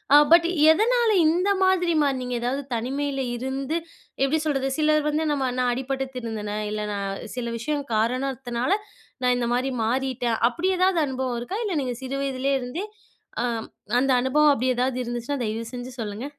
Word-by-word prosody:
அ - - +11 0.2
but 335 0 +6 0.2
எதனால 470 +6 +3 0.2
இந்த 355 +5 +2
மாதிரி 365 -2 +3
மாறுனீங்க? 255 -3 -1
எதாவது 260 +4 -1
தனிமையில 270 +4 -2 0.2
இருந்து, 270 +5 -2 0.5
எப்பிடி 285 +4 +2
சொல்றது? 270 -3 0
சிலர் 305 -1 +3
வந்து 310 +1 0
நம்ம 265 -3 0
"நான் 250 -1 +2
அடிபட்டு 270 +1 -2
திருந்துனேன், 215 -3 -4
இல்ல, 210 0 -2
நான் 200 -1 -2 0.3
சில 245 - -2
விஷயம் 285 +4 -2
காரணத்தினால 250 +3 -1 0.5
நான் 250 0 +4
இந்தமாரி 245 +2 0
மாறிட்டேன்." 250 -1 0
அப்பிடி 345 +9 -1
எதாவது 370 -2 +3
அனுபவம் 255 -2 -2
இருக்கா? 375 - -4
இல்ல 390 -5 -1
நீங்க 250 -2 -3
சிறு 260 +1 -3
வயதிலேயே 270 0 0
இருந்தே 265 +11 -4 0.6
ஆ - - 0 0.5
அந்த 265 +2 +3
அனுபவம் 295 +4 +4
அப்பிடி 260 -2 +1
எதாவது 250 +1 0
இருந்துச்சுன்னா, 240 +3 -3
தயவுசெஞ்சு 230 +3 -4
சொல்லுங்க. 215 +2 -4
265 Hz, 155 wpm, -24 LUFS, 245-290 Hz, 0.6 s, அ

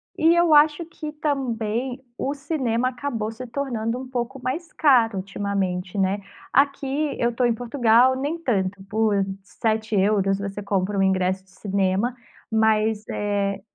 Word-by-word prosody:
E 325 +2 +4
eu 345 -2 +4
acho 300 +2 +5
que, 310 -2 -7
também, 255 -4 -2
o 275 - -1
cinema 260 -5 -1
acabou 245 -4 -3
se 250 +3 -8
tornando, 240 -2 -2
um 260 - -7
pouco 255 +1 -4
mais 310 +7 -3
caro 235 -8 +4
ultimamente, 195 -1 -2
né, 195 +1 +1 0.3
aqui 280 +2 +1
eu 240 0 +1
tô 250 - 0
em 235 - +3
Portugal, 245 +1 +3
nem 285 +5 -2
tanto 200 - -1
por 215 +1 +1 0.3
€7, 205 -2 +1
você 200 +1 -4
compra 200 0 -1
um 195 - +3
ingresso 190 0 +1
de 190 - -26
cinema, 195 +4 0 0.4
mas, 220 -1 +2
eh, 200 -1 -1
225 Hz, 145 wpm, -23 LUFS, 200-265 Hz, 0.4 s, acho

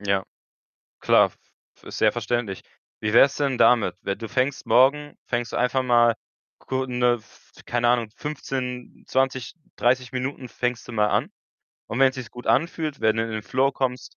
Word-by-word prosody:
Ja 100 -2 0 0.8
klar - - +5 0.5
v - - -24
ist - - -7
sehr - - +4
verständlich. 120 -6 -2 0.4
Wie 105 0 -1
wär's 135 +3 +6
denn 140 -4 0
damit? 115 -6 +4
We 100 0 -2
du 115 -2 -7
fängst 130 +1 -1
morgen 145 +3 +3
fängst 120 -1 -3
du - - -3
einfach 125 +2 +1
mal 120 -2 +4 0.4
ku 130 0 -3
'ne, 125 -1 +2
f 110 -3 -15
keine 120 0 +1
Ahnung, 120 -2 +1
15, 130 -5 -5
20, 130 +1 -1 0.2
30 125 0 +1
Minuten 130 0 -4
fängst 125 -1 -3
du - - -7
mal 105 -2 +2
an - - 0 0.6
und 115 - -4
wenn's 135 0 +4
sich 130 -2 -7
gut 125 - -11
anfühlt, 155 +3 0
wenn 110 0 +2
du 115 - +1
in 115 - -5
den 110 -1 -4
Flow 130 +7 +1
kommst, 130 -2 -3
125 Hz, 180 wpm, -24 LUFS, 115-130 Hz, 0.8 s, wär's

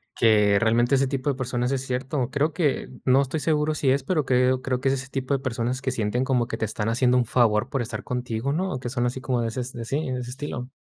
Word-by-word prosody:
que 105 -3 +4
realmente 120 +3 +2
ese 135 0 +2
tipo 135 +1 -1
de - - -4
personas 125 -1 -1
es 135 -2 0
cierto. 130 0 -2
Creo 145 +3 0
que 150 -5 0 0.2
no 135 +2 +5
estoy 140 +4 -3
seguro 155 0 +1
si 145 -3 0
es, 135 +1 +2
pero, 155 +1 +1
creo 125 0 +2
creo 130 -1 -1
que 135 - +2
es - - +2
ese 130 -1 -4
tipo 135 0 -2
de 135 - +1
personas 125 0 -2
que 135 - -1
sienten 120 +1 -1
como 125 -3 +1
que 115 - -4
te 115 - -1
están 110 0 -2
haciendo 125 +2 +3
un 125 - +2
favor 120 +1 +2
por 135 - 0
estar 120 - -5
contigo, 125 +1 -2
¿no? 185 +4 -1
O 130 - -3
que 125 - -5
son 120 -1 0
así 125 +2 -3
como 130 -2 -1
de 115 - -1
ese, 120 +3 -3
de 115 -1 -5
sí, 140 +2 -2
de 125 - -2
ese 120 -1 -6
estilo. 125 -1 -5
130 Hz, 270 wpm, -25 LUFS, 120-135 Hz, 0.2 s, no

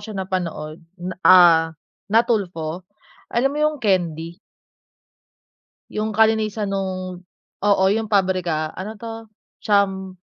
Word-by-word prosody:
siya 210 0 -8
napanood. 170 -5 -4 0.2
Na 180 +1 -5
ah, 175 -3 +7 0.5
na 225 +3 +4
Tulfo. 180 -6 -3 0.4
Alam 265 +4 +1
mo 295 - -4
yung 305 0 +1
candy? 170 -3 -1 1.5
Yung 215 0 -3
kalinisan 220 -1 +2
nung 185 -2 -4 0.4
oo, 200 -2 +3
yung 220 +2 0
pabrika 185 -6 0
ano 205 +4 -6
'to 225 +1 -8 0.4
cham 195 -3 +1
190 Hz, 110 wpm, -21 LUFS, 180-215 Hz, 1.5 s, ah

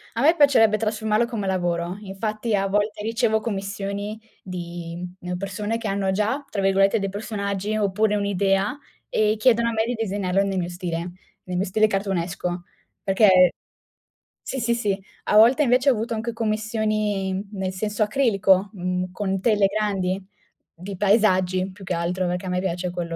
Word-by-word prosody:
A 230 - -1
me 320 +4 +5
piacerebbe 240 -8 +5
trasformarlo 220 +1 0
come 225 -5 -4
lavoro. 175 -1 -1
Infatti 215 +3 -3
a 195 0 +1
volte 210 +1 0
ricevo 225 0 +1
commissioni 200 0 -4 0.2
di, 175 -1 -6 0.2
ehm, 180 0 -4
persone 205 +4 -3
che 230 - -4
hanno 195 -1 0
già 220 +9 -1
tra 200 - -2
virgolette 195 +1 +3
dei 195 0 -2
"personaggi" 200 0 -3
oppure 210 +1 +1
un'idea 200 +3 +1 0.3
e 215 0 +2
chiedono 235 0 +4
a - - -1
me 220 0 0
di 245 - -1
disegnarlo 195 -3 0
nel 195 -1 -1
mio 175 - -2
stile, 175 -2 -4 0.5
nel 180 -1 -3
mio 190 - +1
stile 215 +3 +3
cartoonesco. 180 -3 -2 0.4
Perché 190 -3 +5 0.9
sì, 265 - -4
sì, 235 0 +1
sì. 205 -4 -1 0.2
A 210 - +3
volte 245 +7 +6
invece 255 +1 +3
ho - - +3
avuto 230 +1 -3
anche 230 +1 -3
commissioni 215 -3 -1
in 190 +2 -3
nel 190 -2 -2
senso 210 +3 -1
acrilico, 205 -5 +2
mhmm, 180 -1 -2
con 195 -1 -1
tele 205 -1 +3
grandi, 195 -2 -1 0.5
di 190 +3 -8
paesaggi 190 -2 +2
più 195 0 -12
che 180 - -2
altro, 180 +2 -1
perché 180 +1 -3
a - - -2
me 180 0 0
piace 180 -1 -2
quello 170 -1 -4
200 Hz, 170 wpm, -23 LUFS, 185-215 Hz, 0.9 s, volte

